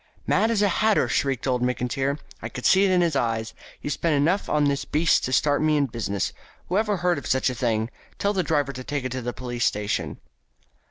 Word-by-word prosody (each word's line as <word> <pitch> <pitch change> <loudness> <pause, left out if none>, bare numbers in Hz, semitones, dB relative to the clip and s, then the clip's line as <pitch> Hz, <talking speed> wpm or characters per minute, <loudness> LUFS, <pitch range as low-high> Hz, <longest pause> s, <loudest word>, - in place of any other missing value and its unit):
"Mad 220 - +2
as 215 -3 +2
a - - +4
hatter!" 215 +3 +2
shrieked 135 -3 0
old 125 -2 0
Mr. 125 0 0
McIntyre. 135 +3 -1 0.2
"I - - -5
could 125 - -7
see 190 +1 +5
it - - +2
in 180 -1 +3
his 170 -4 +1
eye. 115 -4 0 0.3
He - - -7
spent 150 +2 0
enough 165 +8 +1
on 150 -1 +2
this 140 -1 +1
beast 160 +2 +2
to 130 - -3
start 145 +4 +2
me 155 -1 +3
in 145 - +3
business. 110 -5 -3 0.4
Whoever 205 +2 +1
heard 175 -3 +1
of - - -8
such 130 0 +2
a - - -4
thing? 115 -1 -1 0.3
Tell 200 +1 0
the 190 - +1
driver 145 -5 0
to 130 0 -7
take 145 0 -3
it 130 - -3
to 130 0 -3
the 120 +1 -3
police 120 -1 -4
station." 105 0 -1
140 Hz, 230 wpm, -24 LUFS, 125-170 Hz, 0.4 s, see